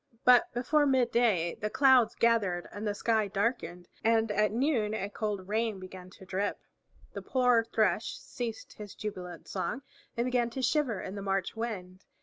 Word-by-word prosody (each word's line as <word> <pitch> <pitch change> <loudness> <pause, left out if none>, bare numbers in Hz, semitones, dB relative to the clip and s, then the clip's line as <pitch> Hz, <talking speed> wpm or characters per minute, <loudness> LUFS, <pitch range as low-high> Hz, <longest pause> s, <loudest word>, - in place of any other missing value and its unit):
But 250 -1 +6
before 290 +5 +2
midday 235 -9 +2
the 210 - -1
clouds 260 -2 +4
gathered 205 -7 +1
and 210 +1 -5
the 205 - -1
sky 220 -1 +1
darkened, 195 -4 -2 0.2
and 225 -1 +2
at 210 0 +2
noon 230 -3 0
a 200 -1 -4
cold 205 -3 -3
rain 220 -1 -1
began 185 -1 -10
to 190 - -13
drip. 195 +2 -2 0.6
The - - -5
poor 250 -3 +3
Thrush 220 0 0
ceased 230 -3 -6
his 210 -2 -10
jubilant 180 -5 -7
song 245 +10 -3 0.3
and 235 - +1
began 250 -2 +1
to 260 +3 -5
shiver 250 -5 +1
in 190 - -6
the 200 - -6
March 195 0 -1
wind. 190 -5 -5
220 Hz, 165 wpm, -30 LUFS, 195-240 Hz, 0.6 s, But